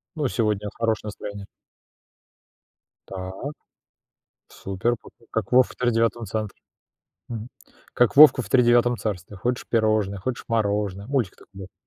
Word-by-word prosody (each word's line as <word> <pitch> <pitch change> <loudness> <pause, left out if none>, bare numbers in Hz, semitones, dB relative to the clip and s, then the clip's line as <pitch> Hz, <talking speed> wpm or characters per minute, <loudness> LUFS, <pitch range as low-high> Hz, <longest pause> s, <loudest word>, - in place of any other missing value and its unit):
Ну, 150 -4 0
сегодня 105 -3 -1
хорошее 110 -2 -1
настроение. 100 -1 -7 1.6
Так. 95 -1 -6 1.2
Супер. 95 +5 -2
Па - - -13 0.2
как 115 0 -3
вов 130 0 +6
в - - -13
Тридевятом 115 -1 +1
центре, 105 +1 -4 0.7
мгм, 115 -1 -6 0.5
как 125 +2 +2
Вовка 145 -3 +9
в 100 - -10
Тридевятом 120 0 +4
царстве: 100 -3 -5
хочешь 120 +6 -2
пирожное, 110 -3 +1
хочешь 120 +6 -4
мороженое. 100 -3 -1
Мультик 130 -8 -1
такой - - -20
был. 95 - -13
110 Hz, 125 wpm, -24 LUFS, 100-120 Hz, 1.6 s, Вовка